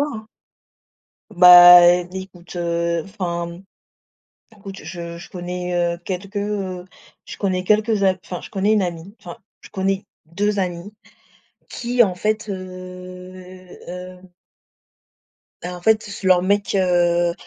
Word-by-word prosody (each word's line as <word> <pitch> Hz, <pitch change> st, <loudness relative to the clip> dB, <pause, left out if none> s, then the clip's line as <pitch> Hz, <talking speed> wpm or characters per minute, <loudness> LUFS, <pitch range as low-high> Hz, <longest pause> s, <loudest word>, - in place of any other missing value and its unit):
hein. 230 Hz, -7 st, -4 dB, 1.0 s
Bah, 175 Hz, 0 st, +9 dB, 0.3 s
écoute, 190 Hz, -2 st, -10 dB
heu, 170 Hz, -1 st, -1 dB
enfin, 170 Hz, -3 st, -5 dB, 1.0 s
écoute 195 Hz, -1 st, -10 dB
je 170 Hz, +1 st, -8 dB
je 170 Hz, -, -12 dB
connais, 180 Hz, -1 st, -3 dB
heu, -, -, -11 dB
quelques, 195 Hz, +2 st, -6 dB
heu, 200 Hz, -3 st, -3 dB, 0.4 s
je -, -, -9 dB
connais 185 Hz, -2 st, -1 dB
quelques 215 Hz, +1 st, +1 dB
a 190 Hz, -1 st, +3 dB
enfin 180 Hz, -, -6 dB
je -, -, -11 dB
connais 200 Hz, +1 st, 0 dB
une 210 Hz, -, +2 dB
amie, 175 Hz, +2 st, -6 dB
enfin 175 Hz, -3 st, -10 dB, 0.2 s
je -, -, -15 dB
connais 195 Hz, -1 st, -2 dB, 0.2 s
2 205 Hz, +5 st, -2 dB
amies 180 Hz, +1 st, -4 dB, 0.8 s
qui 245 Hz, 0 st, +1 dB
en 190 Hz, -5 st, 0 dB
fait, 215 Hz, +3 st, -2 dB
heu, 185 Hz, 0 st, -10 dB, 0.2 s
heu 180 Hz, +1 st, -9 dB, 1.4 s
bah, 180 Hz, 0 st, -6 dB
en -, -, -11 dB
fait 220 Hz, +2 st, +3 dB
s 200 Hz, -, -9 dB
leur 185 Hz, -1 st, +4 dB
mec, 200 Hz, +2 st, 0 dB
heu, 175 Hz, -2 st, +2 dB
185 Hz, 130 wpm, -20 LUFS, 175-200 Hz, 1.4 s, Bah